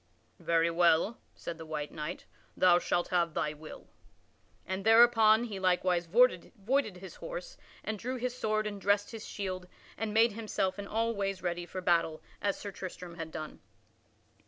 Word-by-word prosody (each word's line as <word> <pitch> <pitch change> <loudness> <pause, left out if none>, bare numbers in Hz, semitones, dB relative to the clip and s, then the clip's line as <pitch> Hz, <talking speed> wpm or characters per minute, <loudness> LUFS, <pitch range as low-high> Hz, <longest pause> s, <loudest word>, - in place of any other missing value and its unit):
"Very 170 0 +2
well," 170 +6 +3 0.2
said 170 -1 -7
the 160 - -7
white 150 -1 -4
knight, 155 +3 -6 0.3
"thou 175 -1 +6
shalt 175 0 0
have 170 -3 +1
thy 150 - 0
will." 155 +1 -11 0.8
And 190 +1 -3
thereupon 225 0 +6
he 210 -5 -5
likewise 180 -1 +1
voided 235 +1 +2
his 185 0 -10
horse - - -7 0.3
and 215 -1 -3
drew 250 +4 -3
his 250 0 -3
sword 215 -3 0
and 205 -2 -5
dressed 205 +1 +2
his 225 -2 -8
shield 185 -3 -4 0.3
and 220 -1 -3
made 225 +2 +4
himself 205 -3 -2
in 200 - -5
all 230 +2 0
ways 195 -3 -3
ready 175 0 -2
for 185 - -5
battle 165 -3 +1 0.2
as 200 -1 0
Sir 205 - -6
Tristram 180 -2 -8
had 165 -1 -5
done. 155 -1 -7
195 Hz, 165 wpm, -31 LUFS, 175-220 Hz, 0.8 s, thou